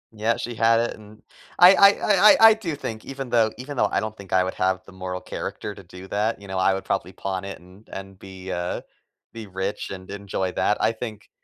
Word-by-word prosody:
Yeah, 110 +2 0
she 120 - -5
had 115 0 +3
it 120 - -1
n 105 0 -16 0.3
I 180 +2 +9
I 200 0 +8
I 205 0 +5
I - - +2
I - - +6
do 190 -8 -4
think 110 -6 -6
even 135 -1 -7
though 115 -2 +3
even 140 +2 -7
though 105 -3 +2
I - - +1
don't 110 0 -4
think 100 -3 -13
I 95 0 +4
would 95 - -3
have 95 0 0
the - - -14
moral 90 -1 -6
character 105 - -6
to 100 - -13
do 90 +2 -12
that, 105 +3 -1
you 100 - -12
know, 95 -1 -3
I 95 +1 +3
would 95 - -6
probably 90 +3 -2
pawn 95 0 -4
it 100 - -7
and 90 +5 -19
and 95 0 -8
be, 95 -1 -9
uh, 90 0 -3 0.5
be 115 -2 -8
rich 95 +1 -4
and 95 -1 -9
enjoy 100 -2 -3
that. 105 - +1
I - - +3
think 110 -3 -8
100 Hz, 240 wpm, -24 LUFS, 95-115 Hz, 0.5 s, I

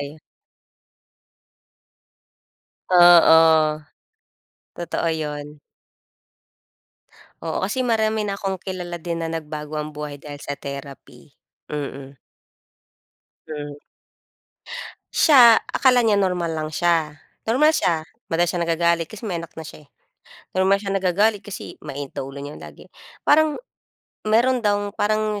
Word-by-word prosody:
Ayun. 145 +2 -8 2.7
Oo. 160 -3 +6 0.9
Totoo 170 -1 -3
yun. 150 -1 -5 1.8
Oo, 160 - -2
kasi 255 +4 -1
marami 220 -2 +1
na 200 - -2
akong 195 -1 -2
kilala 180 -2 -6
din 170 0 -4
na 165 - -3
nagbago 155 -1 -5
ang 150 0 -4
buhay 150 -1 -6
dahil 145 0 -10
sa 140 0 -5
therapy, 140 -1 -10 0.3
mm. 140 -2 -6 1.3
Hmm. 145 -1 -6 1.4
Siya, 245 -7 +7
akala 250 -2 +4
niya 215 -3 +3
normal 180 -3 0
lang 155 0 -3
siya, 160 -3 0 0.3
normal 270 +8 +4
siya. 165 - +1 0.2
Madalas 170 +1 +1
siya 175 - -3
nagagalit 170 0 +1
kasi 215 - -12
may 190 -6 -3
anak 165 0 -9
na 160 - -7
siya, 150 -1 -12
eh, - - -37 0.7
normal 190 +1 +4
siya 200 - -5
nagagalit 195 +2 +1
kasi 205 - -8
mainit 140 0 -6
daw - - -3
ulo 135 +1 -8
niya 145 +1 -8
lagi. - - -13 0.3
Parang 310 +3 +3 0.7
meron 245 +4 +3
daw 205 -2 0
parang 215 0 0
170 Hz, 120 wpm, -22 LUFS, 150-205 Hz, 2.7 s, Siya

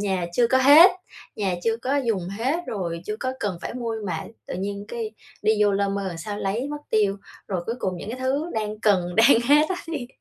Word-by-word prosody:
nhà 190 -4 -1
chưa 235 +6 +3
có 260 +2 +3
hết 295 +8 +9 0.5
nhà 195 -4 0
chưa 225 0 +2
có 260 +5 -1
dùng 220 -10 -1
hết 230 +9 -1
rồi 170 -5 -3
chưa 210 - -3
có 255 0 -1
cần 190 -4 -2
phải - - -5
mua 235 -2 -3
mà 165 -3 -3 0.2
tự - - -5
nhiên 200 +2 -4
cái 225 -2 -4 0.3
đi 215 +1 +4
vô 205 - +3
lơ 200 0 +1
mơ 195 -1 -2
làm 170 -2 -7
sao 205 +4 -5
lấy 215 +8 -2
mất 295 - -3
tiêu, 205 -2 +2 0.3
rồi 185 -3 -2
cuối 230 - -2
cùng 185 -4 -2
những 200 - -7
cái 255 - -6
thứ 275 +5 0
đang 215 -1 -3
cần, 180 -5 +2
đang 230 +1 +6
hết 300 +2 +5
á 375 - -1
thì 295 -7 -4
215 Hz, 235 wpm, -24 LUFS, 195-255 Hz, 0.5 s, hết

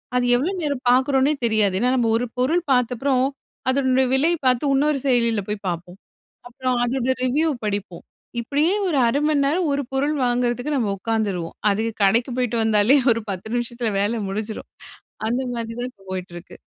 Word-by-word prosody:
அது 250 - +2
எவ்வளோ 280 +10 0
நேரம் 285 -4 -2
பாக்கறோம்ன்னே 265 +3 +3
தெரியாது. 215 -4 +2
ஏன்னா 250 +3 +2
நம்ம 235 -3 +1
ஒரு 245 - -1
பொருள் 320 +8 +2
பாத்தப்றோம், 255 +2 +1 0.4
அதனுடைய 260 -1 +2
விலையை 325 +6 +2
பாத்து 255 +3 +2
இன்னொரு 285 +1 +2
செயலியில 235 -5 +2
போய் 210 -1 -4
பாப்போம். 175 +1 -5 0.5
அப்புறம் 255 +1 -2
அதோட 250 +1 -1
ரெவ்யூ 280 +6 +1 0.2
படிப்போம். 200 -4 -4 0.4
இப்படியே 290 +8 +1
ஒரு 330 -6 0
1/2 255 +5 +1
மணிநேரம் 300 +3 +1
ஒரு 280 0 0
பொருள் 280 +3 0
வாங்குறதுக்கு 245 +3 0
நம்ம 225 -6 0
உக்காந்துருவோம். 200 -6 -2
அது 200 +2 0 0.2
கடைக்கு 230 +6 +3
போய்ட்டு 245 -2 0
வந்தாலே, 220 +4 +4 0.2
ஒரு 230 - -3
10 190 +2 -5
நிமிஷத்தில 240 -1 -2
வேலை 220 +3 0
முடிஞ்சிரும். 215 +2 -5 0.6
அந்த 245 +3 0
மாதிரி 230 0 -5
தான் 250 -1 -5 0.2
போயிட்டு 185 -1 -5
இருக்கு. 175 - -12
245 Hz, 160 wpm, -22 LUFS, 220-270 Hz, 0.6 s, வந்தாலே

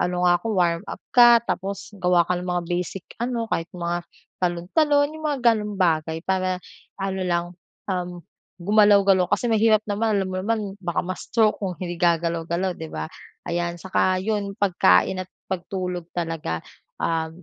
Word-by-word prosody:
ano 180 0 0
nga - - +6
ako - - -7
warm 170 -3 +2
up" - - -8 0.2
ka, 240 -1 +8
tapos 195 +1 -3
gawa 180 -2 +3
ka 180 - +1
ng 180 - -6
mga 175 -1 0
basic 180 +1 -3 0.2
ano 235 -2 -2
kahit 165 +1 -1
mga 175 -1 -3 0.4
talon, 175 -1 0
talon, 290 -2 +4
yung 315 - -10
mga 280 -3 -1
ganong 210 -1 -4
bagay 160 -2 +1
para 185 -1 0 0.4
ano 190 0 -2
lang, 175 -1 +1 0.4
uhm, 180 -2 -3 0.4
gumalaw-galaw. 200 -1 +4
Kasi 240 - +1
mahirap 220 -1 +4
naman 210 0 +1
alam 190 -1 -1
mo 185 - -3
naman 225 +2 0 0.2
baka 175 -1 -2
ma-stroke 210 +4 0
kung 185 -2 -2
hindi 175 -1 -4
gagalaw-galaw 170 +1 0
'di 160 - -6
ba, 80 0 -4 0.4
ayan. 175 0 -2
Tsaka 185 0 +1
'yon 205 -2 -2
pagkain 185 - +3
at 185 - -15 0.2
pagtulog 180 -2 -3
talaga, 165 - -2 0.4
um, 165 +1 -2
180 Hz, 160 wpm, -24 LUFS, 170-205 Hz, 0.4 s, ka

